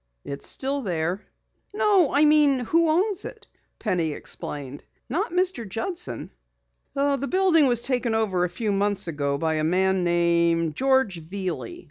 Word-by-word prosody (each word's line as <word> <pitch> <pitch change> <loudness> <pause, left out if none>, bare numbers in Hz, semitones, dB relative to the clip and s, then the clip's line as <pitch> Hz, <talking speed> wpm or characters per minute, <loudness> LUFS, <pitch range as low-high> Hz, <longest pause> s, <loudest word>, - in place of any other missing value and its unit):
"It's 140 - -6
still 275 +1 -1
there." 175 -2 -2 0.5
"No, 400 -7 +3
I 290 +2 +5
mean 295 -3 +4
who 325 +7 +2
owns 370 +5 +1
it," 450 -2 -9 0.3
Penny 165 -4 -1
explained. 145 -1 -6 0.2
"Not 350 - -1
Mr. 360 - 0
Judson?" 350 - -4 0.6
"The 280 -1 0
building 360 -6 +4
was 240 -2 +2
taken 245 -3 0
over 195 -5 +1
a 180 - 0
few 210 +5 -2
months 200 -1 0
ago 140 -3 -1
by 160 +2 0
a 155 - -1
man 185 +3 +2
named 170 -2 +2
George 265 -9 +1
Veeley. 190 - -5
225 Hz, 145 wpm, -24 LUFS, -, 0.6 s, I